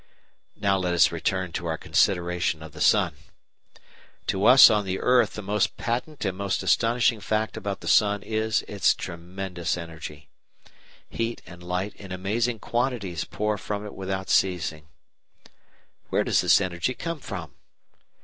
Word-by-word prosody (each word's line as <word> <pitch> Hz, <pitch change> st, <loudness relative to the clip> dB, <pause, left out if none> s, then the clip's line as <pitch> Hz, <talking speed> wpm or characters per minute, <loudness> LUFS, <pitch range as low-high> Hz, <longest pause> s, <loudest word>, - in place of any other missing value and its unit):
§ -, -, -35 dB, 0.5 s
3 -, -, -27 dB
Now 100 Hz, -1 st, +3 dB
let 90 Hz, -1 st, 0 dB
us 85 Hz, -, +5 dB
return 95 Hz, -2 st, -2 dB
to 85 Hz, 0 st, -4 dB
our 80 Hz, -1 st, -1 dB
consideration 85 Hz, -4 st, +1 dB
of 80 Hz, -, -10 dB
the -, -, -10 dB
sun. -, -, +4 dB, 1.1 s
To 95 Hz, +1 st, 0 dB
us 130 Hz, +2 st, +10 dB
on 105 Hz, -1 st, +2 dB
the 95 Hz, -1 st, -3 dB
earth 125 Hz, -3 st, +3 dB
the 105 Hz, -, -6 dB
most 105 Hz, +2 st, 0 dB
patent 125 Hz, +4 st, -3 dB
and 95 Hz, -1 st, -1 dB
most 100 Hz, -1 st, -2 dB
astonishing 115 Hz, 0 st, +2 dB
fact 110 Hz, +1 st, -1 dB
about 100 Hz, -1 st, -4 dB
the -, -, -8 dB
sun 105 Hz, -1 st, +3 dB
is 110 Hz, 0 st, 0 dB
its 100 Hz, -2 st, +1 dB
tremendous 90 Hz, +1 st, -4 dB
energy. 80 Hz, -3 st, -9 dB, 0.8 s
Heat 115 Hz, 0 st, -4 dB
and 90 Hz, 0 st, -12 dB
light 90 Hz, +3 st, -3 dB
in 100 Hz, -2 st, -11 dB
amazing 110 Hz, +6 st, -1 dB
quantities 115 Hz, -, -2 dB
pour 105 Hz, -1 st, -2 dB
from 105 Hz, 0 st, -4 dB
it 105 Hz, -, -8 dB
without 95 Hz, 0 st, -4 dB
ceasing. 80 Hz, -5 st, +1 dB, 1.2 s
Where -, -, +1 dB
does -, -, +2 dB
this -, -, +5 dB
energy 95 Hz, +5 st, -2 dB
come 165 Hz, -2 st, -4 dB
from? 90 Hz, -, -7 dB
95 Hz, 160 wpm, -25 LUFS, 90-110 Hz, 1.2 s, us